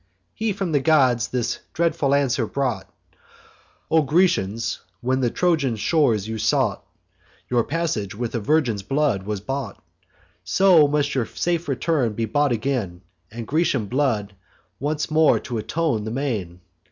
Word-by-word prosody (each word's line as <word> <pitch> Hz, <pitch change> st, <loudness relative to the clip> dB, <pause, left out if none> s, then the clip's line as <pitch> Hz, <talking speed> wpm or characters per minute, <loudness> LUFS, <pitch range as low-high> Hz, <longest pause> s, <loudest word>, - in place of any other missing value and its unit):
He 220 Hz, 0 st, -1 dB
from 195 Hz, -3 st, -3 dB
the 145 Hz, -, +3 dB
gods 130 Hz, -6 st, +3 dB
this 120 Hz, -1 st, -2 dB
dreadful 160 Hz, -4 st, +1 dB
answer 130 Hz, -4 st, +1 dB
brought: 125 Hz, -9 st, -2 dB, 1.0 s
"O 160 Hz, 0 st, +5 dB
Grecians, 130 Hz, -, +1 dB, 0.2 s
when 130 Hz, +4 st, 0 dB
the 125 Hz, -2 st, +1 dB
Trojan 155 Hz, -6 st, +1 dB
shores 110 Hz, -, +1 dB
you 110 Hz, 0 st, -4 dB
sought, 110 Hz, -2 st, +1 dB, 0.7 s
Your 120 Hz, -2 st, +3 dB
passage 140 Hz, -, -2 dB
with 115 Hz, +1 st, -4 dB
a 115 Hz, -, -1 dB
virgin's 120 Hz, -4 st, +1 dB
blood 135 Hz, -4 st, 0 dB
was 105 Hz, -2 st, -3 dB
bought: 135 Hz, -2 st, -4 dB, 0.6 s
So 180 Hz, -6 st, +5 dB
must 145 Hz, 0 st, 0 dB
your 125 Hz, -5 st, 0 dB
safe 170 Hz, -1 st, -2 dB
return 135 Hz, -3 st, 0 dB
be 115 Hz, +2 st, -2 dB
bought 145 Hz, +5 st, +1 dB
again, 110 Hz, -7 st, -2 dB, 0.3 s
And 115 Hz, +1 st, -7 dB
Grecian 140 Hz, -5 st, +1 dB
blood 110 Hz, -4 st, -1 dB, 0.5 s
once 150 Hz, +3 st, -2 dB
more 155 Hz, 0 st, +4 dB
atone 125 Hz, +1 st, -2 dB
the -, -, -3 dB
main." 110 Hz, -9 st, -3 dB
130 Hz, 140 wpm, -23 LUFS, 110-150 Hz, 1.0 s, O